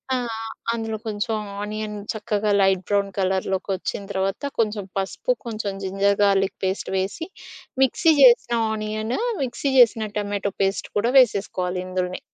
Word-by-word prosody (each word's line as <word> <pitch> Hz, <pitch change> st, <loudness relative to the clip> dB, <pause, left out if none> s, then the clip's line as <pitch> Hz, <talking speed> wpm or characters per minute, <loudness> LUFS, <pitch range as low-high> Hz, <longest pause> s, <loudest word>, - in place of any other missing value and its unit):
ఆ! -, -, +1 dB, 0.6 s
అందులో 225 Hz, -1 st, -3 dB
కొంచెం 220 Hz, +1 st, -1 dB, 0.3 s
ఆనియన్ 210 Hz, 0 st, -4 dB, 0.2 s
చక్కగా 210 Hz, -1 st, -1 dB
లైట్ 190 Hz, -1 st, +3 dB
బ్రౌన్ 200 Hz, -1 st, +1 dB
కలర్‌లోకొచ్చిన 190 Hz, +1 st, -1 dB
తర్వాత 195 Hz, +4 st, -1 dB, 0.2 s
కొంచెం 215 Hz, -2 st, +1 dB
పసుపు, 195 Hz, -, -1 dB
కొంచెం 215 Hz, -3 st, -3 dB
జింజర్ 195 Hz, +1 st, +1 dB
గార్లిక్ 195 Hz, -1 st, +2 dB
పేస్ట్ 190 Hz, +1 st, -2 dB
వేసి, 195 Hz, -, -3 dB, 0.6 s
మిక్సీ 320 Hz, +5 st, +4 dB
జేసిన 240 Hz, -2 st, +6 dB, 0.2 s
ఆనియన్, 215 Hz, +2 st, -2 dB, 0.3 s
మిక్సీ 270 Hz, +2 st, -2 dB
జేసిన 230 Hz, -2 st, +5 dB, 0.2 s
టమాటో 205 Hz, -1 st, -2 dB
పేస్ట్ 195 Hz, +1 st, -1 dB
కూడా 230 Hz, +4 st, +2 dB
వేసేసుకోవాలి 185 Hz, -6 st, +1 dB
ఇందులోనే. 185 Hz, 0 st, -2 dB
205 Hz, 125 wpm, -23 LUFS, 195-220 Hz, 0.6 s, జేసిన